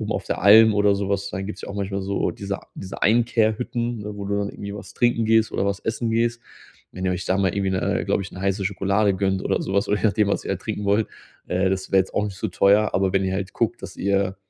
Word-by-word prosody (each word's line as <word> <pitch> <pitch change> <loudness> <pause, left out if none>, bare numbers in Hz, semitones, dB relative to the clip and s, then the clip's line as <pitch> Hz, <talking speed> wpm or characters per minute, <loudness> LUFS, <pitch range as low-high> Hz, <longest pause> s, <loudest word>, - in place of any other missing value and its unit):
oben - - -4
auf - - -3
der - - -3
Alm 110 +3 +8
oder 105 -1 +3
so 100 0 -2
was 100 0 -1
dann 95 +1 -4
gibt's 105 - -7
ja - - -7
auch 100 - -6
manchmal 100 0 -3
so 100 +1 -1
diese 100 0 -5 0.2
diese 95 0 -8
Einkehr-Hütten, 115 +1 +1
ne, 105 0 -7
wo 100 - -6
du 100 +1 -1
dann 100 0 -1
irgendwie 100 0 -7
was 105 - -10
trinken 120 -2 +2
gehst 110 0 +3
oder 100 - 0
was 100 0 -1
essen 115 +1 -2
gehst. 115 +1 0 0.5
Wenn 95 - -6
ihr 95 - +1
euch 90 0 -4
da 95 - +1
mal 95 -2 +1
irgendwie 100 -1 0
'ne, 95 - 0
äh, - - -3
glaube - - +1
ich, 95 - -9
'ne 90 - -8
heiße 100 +1 -1
Schokolade 100 +1 +1
gönnt 95 0 -1
oder - - 0
so 95 - -4
was 100 - +1
oder 105 - +2
je - - -7
nachdem, 105 0 +2
was 100 - -1
ihr - - 0
da - - -1
trinken 105 - -5
wollt, 105 +2 +2 0.4
äh, 95 +1 +1
das 95 0 -2
wäre 95 - +6
jetzt 95 - -4
auch 105 - +1
nicht 100 -2 -5
so 110 - -2
teuer. 100 +3 +3
Aber, 95 0 +1
wenn 95 0 +2
ihr 95 - -1
halt 95 -1 -4
guckt, - - -1
dass - - -8
ihr 100 -1 0
100 Hz, 280 wpm, -23 LUFS, 95-105 Hz, 0.5 s, Alm